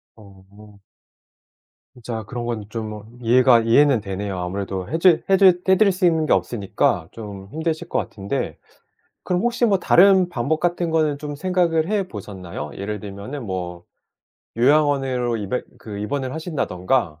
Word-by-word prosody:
어. 100 0 -17 1.1
진짜 115 -2 -6
그런 120 +3 -6
건 115 -3 -3
좀 110 0 -7
이해가 120 0 +5
이해는 125 +2 +4
되네요. 100 -1 -4
아무래도 95 +1 -4
해 160 - 0
주 175 -2 +5
해 195 - +5
드 195 - +5 0.2
해 190 - +7
드릴 210 -1 +5
수 185 0 0
있는 160 -2 +3
게 - - +4
없으니까 100 -7 0
좀 100 -3 -9
힘드실 160 +1 -3
것 - - -1
같은데 100 -1 -3 0.7
그럼 180 0 0
혹시 240 0 +1
뭐 200 -4 +3
다른 190 +1 +5
방법 145 +1 -1
같은 175 0 0
거는 155 -3 +1
좀 145 -1 -5
생각을 170 -1 +1
해 205 -3 0
보셨나요? 95 - -7
예를 105 +1 -4
들면은 105 +7 -7
뭐 90 -3 -5 0.7
요양원으로 135 -2 +2
입에 105 +5 -3 0.2
그 105 -2 -8
입원을 130 +5 -3
하신다든가 125 - -1
120 Hz, 305 characters per minute, -22 LUFS, 100-160 Hz, 1.1 s, 해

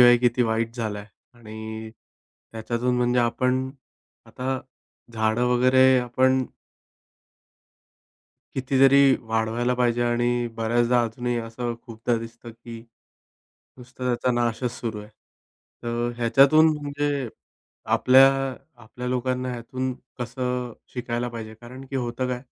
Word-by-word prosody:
आहे 120 0 +7
किती 125 0 +2
वाईट 115 0 -1
झालाय? 105 -3 -4 0.3
आणि 110 -1 -8 0.6
त्याच्यातून 120 +2 -1
म्हणजे 125 0 +2
आपण 125 +2 0 0.6
आता 130 +1 -3 0.5
झाडं 110 +2 +1
वगैरे 130 +1 +5
आपण 130 +2 +2 2.1
कितीतरी 135 +1 +4 0.3
वाढवायला 115 +2 0
पाहिजे. 120 -1 +1
आणि 120 0 +1
बऱ्याचदा 120 +2 +2
अजूनही 120 +1 -3
असं 120 +1 -4
खूपदा 115 +1 -1
दिसतं 115 +1 -10
की 115 0 -10 1.0
नुसता 130 0 -10
त्याचा 125 0 +1
नाशच 120 +1 0
सुरू 115 -3 -3
आहे. 105 - -12 0.7
तर 120 0 -1
ह्याच्यातून 135 +6 +5
म्हणजे 145 -2 -2 0.7
आपल्या 130 +1 +7 0.6
आपल्या 125 +3 -8
लोकांना 125 0 -1
ह्यातून 130 +2 -4 0.3
कसं 125 0 -3 0.2
शिकायला 120 0 -2
पाहिजे, 110 -2 -7
कारण 125 +4 -11
की 135 - -4
होतं 125 0 -2
काय? 125 0 -3
120 Hz, 110 wpm, -24 LUFS, 115-130 Hz, 2.1 s, आहे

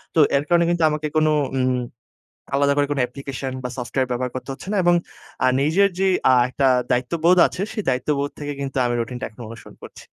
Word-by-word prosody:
তো 160 - +3 0.2
এর 140 - -1
কারণে 170 0 +4
কিন্তু 170 -1 +1
আমাকে 150 0 -2
কোনো 155 0 +3 0.3
উম 130 0 +1 0.8
আলাদা 140 0 +3
করে 145 -1 +2
কোনো 145 -2 -1
অ্যাপ্লিকেশন 135 +1 -6
বা - - -1
সফটওয়্যার 125 +1 -2
ব্যবহার 125 +1 -2
করতে 130 +1 -6
হচ্ছে 135 - -10
না, - - 0
এবং 175 0 +5 0.5
আ - - +5
নিজের 170 +8 +3
যেই 190 -1 +2 0.2
আ - - +6 0.2
একটা 135 +2 0 0.2
দায়িত্ববোধ 160 +8 +2
আছে, 185 - -7
সেই 215 -3 -4
দায়িত্ববোধ 140 +2 0
থেকে 145 -1 -4
কিন্তু 135 -1 -5
আমি 120 0 0
রুটিনটা 125 +1 -4
এখন 110 - -19
অনুসরণ 115 -1 -12
করছি। - - -12
140 Hz, 200 wpm, -22 LUFS, 125-155 Hz, 0.8 s, আ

